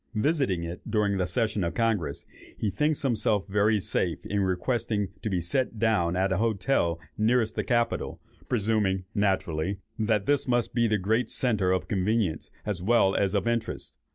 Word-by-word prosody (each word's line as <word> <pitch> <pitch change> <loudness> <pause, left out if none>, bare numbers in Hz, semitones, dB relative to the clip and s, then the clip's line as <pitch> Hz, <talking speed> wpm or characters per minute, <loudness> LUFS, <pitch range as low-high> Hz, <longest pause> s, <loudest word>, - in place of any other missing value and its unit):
Visiting 125 - +1
it 85 +2 -6
during 105 -2 +1
the 90 - +1
session 105 +1 0
of 85 - -2
Congress, 105 -11 0 0.3
he 105 - -1
thinks 150 +9 0
himself 110 -5 +1
very 105 +2 +2
safe 85 -4 -2
in 100 - -1
requesting 105 +2 0
to 110 - -2
be 95 -3 0
set 110 +8 -1
down 105 -6 +2
at 95 +1 +1
the 95 - +1
hotel 100 -5 +1 0.2
nearest 110 0 +2
the - - -2
Capitol, 120 -2 0 0.3
presuming, 105 -5 +1
naturally, 95 -3 0 0.2
that 110 -2 +1
this 145 -2 +1
must 120 -2 +1
be 120 0 +3
the 105 -1 +2
great 110 +6 0
centre 105 -7 +1
of 95 - 0
convenience, 100 -3 0 0.2
as 100 -5 -2
well 100 -1 +3
as 100 0 +1
of 100 +2 0
interest. 115 -1 -2
105 Hz, 170 wpm, -27 LUFS, 95-115 Hz, 0.3 s, be